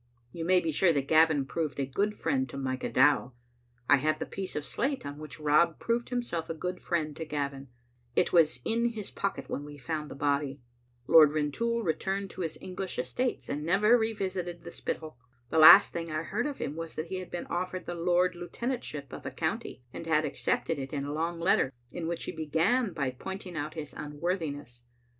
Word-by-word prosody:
You 165 Hz, +3 st, -5 dB
may 185 Hz, +1 st, +5 dB
be 165 Hz, -2 st, -1 dB
sure 170 Hz, +4 st, +4 dB
that 140 Hz, -2 st, -1 dB
Gavin 155 Hz, -3 st, +4 dB
proved 145 Hz, -1 st, -3 dB
a 135 Hz, -, +1 dB
good 205 Hz, +10 st, -1 dB
friend 130 Hz, -7 st, 0 dB
to 135 Hz, -, -7 dB
Micah 130 Hz, -1 st, -2 dB
Dow. 135 Hz, -1 st, +4 dB, 0.5 s
I 145 Hz, -, +7 dB
have 155 Hz, +3 st, +1 dB
the -, -, -3 dB
piece 190 Hz, -1 st, -5 dB
of 150 Hz, -, -2 dB
slate 270 Hz, -, -1 dB
on 145 Hz, +1 st, -6 dB
which 155 Hz, 0 st, -9 dB
Rob 155 Hz, +2 st, +3 dB
proved 235 Hz, +1 st, -1 dB
himself 240 Hz, -10 st, -2 dB
a 165 Hz, -, -2 dB
good 180 Hz, +3 st, -4 dB
friend 155 Hz, -4 st, -1 dB
to 165 Hz, -, -4 dB
Gavin; 140 Hz, -3 st, -3 dB, 0.5 s
it -, -, +2 dB
was 155 Hz, -7 st, +4 dB
in 235 Hz, +1 st, +1 dB
his 210 Hz, -3 st, -6 dB
pocket 200 Hz, -, -3 dB
when 145 Hz, -, -4 dB
we 145 Hz, 0 st, -10 dB
found 150 Hz, +3 st, -4 dB
the -, -, -8 dB
body. 140 Hz, -1 st, 0 dB, 0.5 s
Lord 155 Hz, 0 st, +7 dB
Rintoul 230 Hz, +11 st, 0 dB
returned 195 Hz, +3 st, -1 dB
to -, -, -7 dB
his 165 Hz, -2 st, -3 dB
English 185 Hz, 0 st, -5 dB
estates, 125 Hz, -, -2 dB
and 145 Hz, +1 st, -3 dB
never 200 Hz, +8 st, +4 dB
revisited 190 Hz, -7 st, -2 dB
the 170 Hz, -, -8 dB
Spittal. 155 Hz, -6 st, -5 dB, 0.3 s
The 160 Hz, -, +3 dB
last 160 Hz, +6 st, +10 dB
thing 165 Hz, -1 st, -4 dB
I 155 Hz, +1 st, -1 dB
heard 230 Hz, -, -1 dB
of 290 Hz, -, -5 dB
him 145 Hz, -, -4 dB
was 165 Hz, 0 st, -6 dB
that 155 Hz, +2 st, -4 dB
he 190 Hz, -, -3 dB
had 185 Hz, -, -8 dB
been 175 Hz, -, -4 dB
offered 185 Hz, +1 st, -3 dB
the 175 Hz, -, -4 dB
Lord 175 Hz, +1 st, +2 dB
Lieutenantship 175 Hz, -, -4 dB
of -, -, -7 dB
a -, -, -1 dB
county, -, -, -3 dB
and 165 Hz, -, -7 dB
had 155 Hz, -1 st, +3 dB
accepted 150 Hz, +1 st, -1 dB
it 135 Hz, +1 st, -6 dB
in 140 Hz, -1 st, -2 dB
a 145 Hz, -, -4 dB
long 165 Hz, +2 st, -2 dB
letter, 170 Hz, -6 st, +3 dB, 0.2 s
in 170 Hz, -2 st, -4 dB
which 170 Hz, 0 st, -2 dB
he -, -, -3 dB
began 165 Hz, -, +1 dB
by 140 Hz, -5 st, -1 dB
point 190 Hz, +10 st, -7 dB
ing 180 Hz, -2 st, -8 dB
out 155 Hz, +1 st, -4 dB
his 150 Hz, -3 st, -6 dB
unworthiness. 145 Hz, -5 st, -4 dB
160 Hz, 210 wpm, -29 LUFS, 145-185 Hz, 0.5 s, last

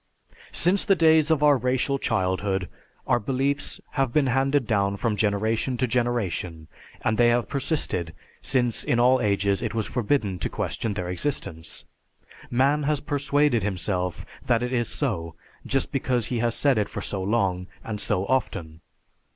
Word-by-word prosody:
Since 185 Hz, +4 st, +3 dB
the 195 Hz, -, +4 dB
days 160 Hz, -2 st, +4 dB
of 155 Hz, -2 st, +2 dB
our 145 Hz, -1 st, +6 dB
racial 130 Hz, +2 st, 0 dB
childhood, 95 Hz, -3 st, 0 dB, 0.4 s
our -, -, +2 dB
beliefs 135 Hz, +5 st, -1 dB
have 135 Hz, -3 st, 0 dB
been 145 Hz, +2 st, +3 dB
handed 135 Hz, +1 st, +2 dB
down 100 Hz, -3 st, +1 dB
from 110 Hz, 0 st, 0 dB
generation 110 Hz, +4 st, 0 dB
to 130 Hz, -, +1 dB
generation, 110 Hz, -10 st, -1 dB, 0.4 s
and 110 Hz, +1 st, 0 dB
they 120 Hz, 0 st, +6 dB
have 120 Hz, 0 st, +1 dB
persisted 135 Hz, -, -2 dB, 0.3 s
since 120 Hz, -4 st, 0 dB
in 120 Hz, -, +1 dB
all 130 Hz, +2 st, +4 dB
ages 100 Hz, -1 st, +1 dB
it 115 Hz, -2 st, -3 dB
was 110 Hz, -2 st, 0 dB
forbidden 110 Hz, -6 st, 0 dB
to 80 Hz, -, -2 dB
question 110 Hz, -3 st, -3 dB
their 90 Hz, -1 st, -3 dB
existence. 90 Hz, -, -4 dB, 0.6 s
Man 135 Hz, +5 st, +2 dB
has 150 Hz, 0 st, 0 dB
persuaded 145 Hz, -3 st, +1 dB
himself 90 Hz, -2 st, -2 dB, 0.2 s
that 120 Hz, -1 st, +1 dB
it 125 Hz, +1 st, -2 dB
is 120 Hz, -2 st, 0 dB
so 95 Hz, -, -2 dB, 0.3 s
just 135 Hz, -1 st, 0 dB
because 125 Hz, -4 st, 0 dB
he 120 Hz, -, 0 dB
has 115 Hz, 0 st, +1 dB
said 140 Hz, -6 st, +3 dB
it 105 Hz, -, -1 dB
for -, -, -5 dB
so 95 Hz, -, -3 dB
long 95 Hz, -3 st, 0 dB, 0.2 s
and 105 Hz, -2 st, -4 dB
so 95 Hz, -2 st, 0 dB
often. 85 Hz, -10 st, -2 dB
120 Hz, 160 wpm, -25 LUFS, 100-135 Hz, 0.6 s, our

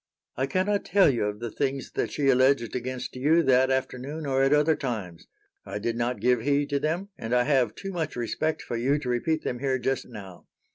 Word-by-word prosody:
"I 135 Hz, +2 st, -1 dB
cannot 195 Hz, +6 st, 0 dB
tell 195 Hz, -7 st, +4 dB
you 120 Hz, -5 st, -1 dB
of 105 Hz, 0 st, -3 dB
the 120 Hz, -1 st, -5 dB
things 135 Hz, +1 st, -2 dB
that -, -, -2 dB
she 145 Hz, -, -1 dB
alleged 130 Hz, -2 st, +3 dB
against 125 Hz, 0 st, -4 dB
you 155 Hz, +6 st, +3 dB
that 130 Hz, -1 st, +4 dB
afternoon 130 Hz, +3 st, -2 dB
or 135 Hz, -1 st, +1 dB
at 135 Hz, 0 st, +3 dB
other 150 Hz, +2 st, +4 dB
times. 105 Hz, -, -5 dB, 0.4 s
I -, -, -5 dB
did 115 Hz, +3 st, -2 dB
not 120 Hz, -1 st, -1 dB
give 125 Hz, +2 st, +2 dB
heed 145 Hz, +3 st, +1 dB
to 140 Hz, -, +1 dB
them, 170 Hz, +7 st, -2 dB
and 115 Hz, +2 st, -1 dB
I 125 Hz, -, +4 dB
have 135 Hz, -3 st, +2 dB
too 195 Hz, -, -6 dB
much 170 Hz, -4 st, -3 dB
respect 140 Hz, +6 st, -2 dB
for -, -, -4 dB
you 130 Hz, +5 st, +1 dB
to 130 Hz, -4 st, -5 dB
repeat 155 Hz, +6 st, 0 dB
them 125 Hz, -, -3 dB
here 135 Hz, 0 st, 0 dB
just 130 Hz, +1 st, -2 dB
now. 100 Hz, -6 st, -11 dB
130 Hz, 220 wpm, -26 LUFS, 120-145 Hz, 0.4 s, tell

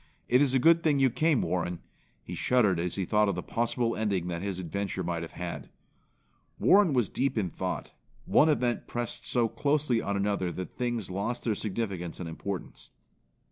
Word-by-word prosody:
It 125 Hz, +2 st, +4 dB
is 135 Hz, -2 st, +3 dB
a -, -, +6 dB
good 165 Hz, +6 st, +5 dB
thing 150 Hz, -3 st, +2 dB
you 135 Hz, -2 st, +4 dB
came, 155 Hz, +2 st, +2 dB
Warren." 90 Hz, -1 st, -1 dB, 0.4 s
He -, -, -7 dB
shuddered 105 Hz, -9 st, +2 dB
as 90 Hz, 0 st, -2 dB
he 95 Hz, -, -1 dB
thought 105 Hz, +2 st, +3 dB
of 100 Hz, -, -1 dB
the 90 Hz, -, -4 dB
possible 115 Hz, 0 st, 0 dB
ending 100 Hz, -5 st, -1 dB
that 85 Hz, -1 st, -3 dB
his 95 Hz, -2 st, -3 dB
adventure 95 Hz, +2 st, -3 dB
might 85 Hz, -1 st, -2 dB
have 85 Hz, -, -7 dB
had. 85 Hz, 0 st, -6 dB, 0.9 s
Warren 195 Hz, -5 st, +5 dB
was 120 Hz, -5 st, +2 dB
deep 135 Hz, +4 st, -1 dB
in 95 Hz, -6 st, 0 dB
thought. -, -, -4 dB, 0.3 s
One 160 Hz, -, +5 dB
event 125 Hz, -5 st, 0 dB
pressed 120 Hz, -1 st, -4 dB
so 120 Hz, -2 st, +2 dB
closely 140 Hz, -2 st, +1 dB
on 100 Hz, 0 st, -2 dB
another 100 Hz, -3 st, 0 dB
that 90 Hz, -, -6 dB
things 120 Hz, -6 st, -2 dB
lost 105 Hz, +6 st, -2 dB
their 115 Hz, -, +1 dB
significance 100 Hz, -5 st, -4 dB
and 90 Hz, -, -4 dB
importance. 90 Hz, +3 st, -6 dB
105 Hz, 185 wpm, -29 LUFS, 90-125 Hz, 0.9 s, a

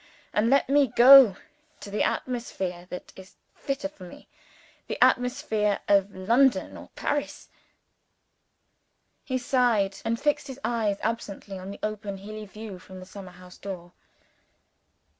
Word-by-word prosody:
And 215 Hz, +2 st, +2 dB
let 275 Hz, +1 st, +3 dB
me 280 Hz, +1 st, +4 dB
go 245 Hz, -2 st, +8 dB, 0.4 s
to 200 Hz, -, -10 dB
the 210 Hz, -, -1 dB
atmosphere 190 Hz, -8 st, -3 dB
that 180 Hz, -, -8 dB
is 190 Hz, 0 st, -14 dB, 0.2 s
fitter 275 Hz, +1 st, -3 dB
for 290 Hz, -10 st, -15 dB
me 175 Hz, -, -13 dB, 0.6 s
the -, -, -4 dB
atmosphere 245 Hz, -5 st, +2 dB
of 200 Hz, 0 st, +3 dB
London 235 Hz, +8 st, +2 dB
or -, -, -11 dB
Paris." 290 Hz, 0 st, -3 dB, 1.7 s
He 260 Hz, -, -2 dB
sighed, 240 Hz, -6 st, +1 dB
and 230 Hz, 0 st, -1 dB
fixed 295 Hz, -1 st, 0 dB
his 265 Hz, 0 st, -8 dB
eyes 220 Hz, -4 st, 0 dB
absently 205 Hz, -3 st, -4 dB
on 185 Hz, +1 st, -8 dB
the 200 Hz, -, -7 dB
open 215 Hz, -2 st, -4 dB
hilly 210 Hz, +2 st, -8 dB
view 210 Hz, -2 st, -9 dB
from 185 Hz, 0 st, -12 dB
the 185 Hz, -, -10 dB
summer 185 Hz, -1 st, -11 dB
house 180 Hz, 0 st, -15 dB
door. 180 Hz, -3 st, -7 dB
215 Hz, 140 wpm, -26 LUFS, 195-250 Hz, 1.7 s, go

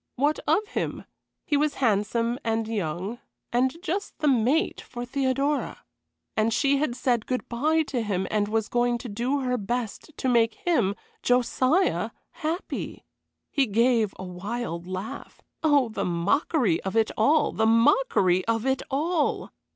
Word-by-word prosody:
What 290 Hz, +4 st, +1 dB
of 360 Hz, +8 st, +3 dB
him? -, -, -3 dB, 0.4 s
He 295 Hz, -, +1 dB
was 295 Hz, 0 st, +1 dB
handsome 230 Hz, +1 st, +1 dB
and 225 Hz, -1 st, 0 dB
young, 195 Hz, +1 st, -3 dB, 0.3 s
and 255 Hz, +5 st, +2 dB
just 390 Hz, +5 st, -3 dB
the 305 Hz, -, 0 dB
mate 270 Hz, -, +2 dB
for 240 Hz, -1 st, -7 dB
Theodora. 275 Hz, +3 st, -1 dB, 0.5 s
And 220 Hz, +1 st, +2 dB
she 280 Hz, +4 st, +2 dB
had 275 Hz, -4 st, -1 dB
said 245 Hz, -3 st, 0 dB
good 255 Hz, -1 st, -2 dB
bye 310 Hz, +7 st, +1 dB
to 265 Hz, -5 st, -2 dB
him, 195 Hz, -4 st, -1 dB
and 210 Hz, -1 st, +1 dB
was 220 Hz, 0 st, 0 dB
going 240 Hz, 0 st, +1 dB
to 240 Hz, -, -8 dB
do 245 Hz, +7 st, -1 dB
her 250 Hz, -1 st, 0 dB
best 230 Hz, +5 st, -3 dB
to -, -, -2 dB
make 235 Hz, -2 st, +3 dB
him 320 Hz, -, +1 dB, 0.3 s
Josiah 255 Hz, +8 st, +2 dB, 0.2 s
happy. 335 Hz, +3 st, -4 dB, 0.5 s
He 275 Hz, -3 st, +2 dB
gave 225 Hz, -1 st, +2 dB
a -, -, -7 dB
wild 180 Hz, -1 st, -5 dB
laugh. 185 Hz, +3 st, -6 dB, 0.2 s
Oh, 290 Hz, -6 st, +3 dB
the 215 Hz, -, -3 dB
mockery 200 Hz, -, +1 dB
of 190 Hz, +2 st, -4 dB
it 225 Hz, -1 st, +3 dB
all, 295 Hz, +8 st, +3 dB
the 220 Hz, -, +1 dB
mockery 225 Hz, -, +4 dB
of 225 Hz, +1 st, 0 dB
it 265 Hz, 0 st, +1 dB
all! 305 Hz, +3 st, 0 dB
240 Hz, 150 wpm, -26 LUFS, 220-285 Hz, 0.5 s, mockery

